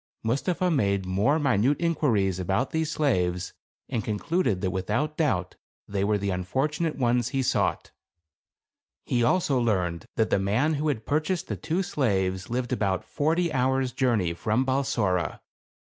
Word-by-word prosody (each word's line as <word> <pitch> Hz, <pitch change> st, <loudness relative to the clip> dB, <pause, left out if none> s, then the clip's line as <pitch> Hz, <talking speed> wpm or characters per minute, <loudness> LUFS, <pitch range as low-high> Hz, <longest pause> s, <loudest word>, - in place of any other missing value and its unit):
Mustapha 175 Hz, +10 st, 0 dB
made 100 Hz, -, +1 dB
more 100 Hz, +11 st, +2 dB
minute 135 Hz, -2 st, +2 dB
inquiries 115 Hz, -, +1 dB
about 95 Hz, +8 st, 0 dB
these 160 Hz, -1 st, 0 dB
slaves 90 Hz, -, 0 dB, 0.3 s
and 115 Hz, -5 st, -2 dB
concluded 105 Hz, -, 0 dB
that 95 Hz, -, 0 dB
without 110 Hz, +12 st, -1 dB
doubt 95 Hz, -, 0 dB, 0.3 s
they 100 Hz, -1 st, -1 dB
were 105 Hz, +1 st, +2 dB
the 100 Hz, 0 st, -2 dB
unfortunate 145 Hz, -, -1 dB
ones 120 Hz, -2 st, +1 dB
he 135 Hz, -2 st, -1 dB
sought. -, -, 0 dB, 1.1 s
He 120 Hz, -1 st, +1 dB
also 140 Hz, 0 st, +2 dB
learned 90 Hz, -8 st, 0 dB
that 110 Hz, -, +1 dB
the -, -, +3 dB
man 110 Hz, +11 st, +1 dB
who 150 Hz, +1 st, -1 dB
had 120 Hz, -7 st, -1 dB
purchased 155 Hz, +4 st, -1 dB
the 105 Hz, -, -1 dB
two 165 Hz, -, -1 dB
slaves 95 Hz, -, -1 dB
lived 125 Hz, +1 st, -2 dB
about 100 Hz, -6 st, 0 dB
forty 165 Hz, +2 st, 0 dB
hours 130 Hz, 0 st, +1 dB
journey 115 Hz, -10 st, +1 dB
from 110 Hz, +9 st, 0 dB
Balsora. 130 Hz, -9 st, 0 dB
120 Hz, 145 wpm, -26 LUFS, 100-150 Hz, 1.1 s, the